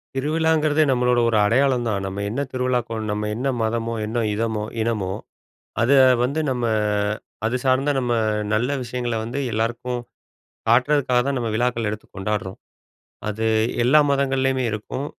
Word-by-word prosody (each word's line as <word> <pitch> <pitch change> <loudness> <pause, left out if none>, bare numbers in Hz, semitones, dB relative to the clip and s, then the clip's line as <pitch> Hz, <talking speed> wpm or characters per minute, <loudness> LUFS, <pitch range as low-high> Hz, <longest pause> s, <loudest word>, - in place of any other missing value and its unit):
திருவிழாங்கிறதே 155 +1 +2
நம்மளோட 125 -1 +2
ஒரு 110 - +2
அடையாளம் 125 +3 +2
தான். 100 -3 -1
நம்ம 95 +1 -4
என்ன 120 +7 -2
திருவிழாக்கு 125 -2 -1
கோ - - -2
நம்ம 105 0 -2
என்ன 125 +4 -2
மதமோ, 115 +1 -1
என்ன 115 +2 -1
இனமோ 110 0 -1 0.2
இனமோ, 110 -4 -1 0.7
அத 120 +3 +2 0.3
வந்து 140 +5 0
நம்ம 125 -2 -2 0.8
அது 115 +3 0
சார்ந்த 130 +2 +3
நம்ம 120 -2 0 0.4
நல்ல 115 +4 +1
விஷயங்கள 120 -1 -3
வந்து 120 +5 -4
எல்லாருக்கும் 120 +3 -2 0.7
காட்டுறதுக்காகதான் 130 +1 +2
நம்ம 120 -2 -2
விழாக்கள் 115 -1 0
எடுத்து 110 0 -7
கொண்டாட்றோம். 95 -1 -3 0.7
அது 110 +1 -2 0.4
எல்லா 145 +5 +6
மதங்கள்லயுமே 135 -1 +1
இருக்கும். 110 +6 -4
120 Hz, 135 wpm, -22 LUFS, 110-130 Hz, 0.8 s, எல்லா